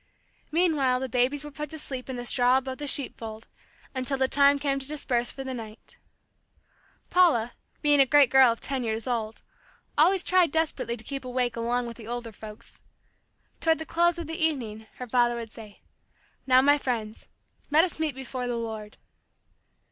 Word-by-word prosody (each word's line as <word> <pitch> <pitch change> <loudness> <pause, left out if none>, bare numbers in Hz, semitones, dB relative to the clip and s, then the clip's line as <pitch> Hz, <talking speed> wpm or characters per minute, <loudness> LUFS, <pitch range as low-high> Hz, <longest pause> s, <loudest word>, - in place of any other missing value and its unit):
Meanwhile 300 -7 +2
the 265 - -3
babies 255 +4 0
were 295 - -8
put 300 +1 -6
to 315 - -8
sleep 265 -4 -7
in 260 - -3
the 245 0 -5
straw 250 +1 +3
above 265 0 -4
the 295 - -4
sheep 275 -1 +1
fold, 220 0 -8 0.5
until 265 +1 -1
the 265 0 +2
time 280 +1 +5
came 275 -1 -1
to 270 - -3
disperse 250 -5 -1
for 270 - -7
the 265 -1 -5
night 220 -3 -10 1.1
Paula, 295 -11 +4 0.3
being 295 -1 +4
a 270 - +6
great 285 -2 +5
girl 265 -2 +7
of 230 - -4
ten 270 -2 -2
years 220 -1 -2
old, 225 -3 -3 0.6
always 365 +4 +4
tried 365 -2 +3
desperately 315 -7 -1
to 220 - -10
keep 275 +3 -5
awake 250 -1 -1
along 240 +1 -1
with 235 -1 -7
the 225 -2 -11
older 240 -1 -5
folks. 215 +2 -12 0.8
Toward 320 -1 +2
the 320 - -6
close 345 +1 +2
of 340 - -5
the 325 +1 -3
evening, 225 -9 -2
her 250 - -6
father 240 0 +2
would 230 -2 -6
say, 215 -3 -12 0.7
"Now, 255 0 +6
my 290 +1 +5
friends, 225 -5 -4 0.4
let 305 +2 +5
us 350 -3 -3
meet 310 -4 -1
before 255 -1 -5
the 240 -1 -2
Lord." 220 -2 -6
260 Hz, 185 wpm, -27 LUFS, 235-290 Hz, 1.1 s, girl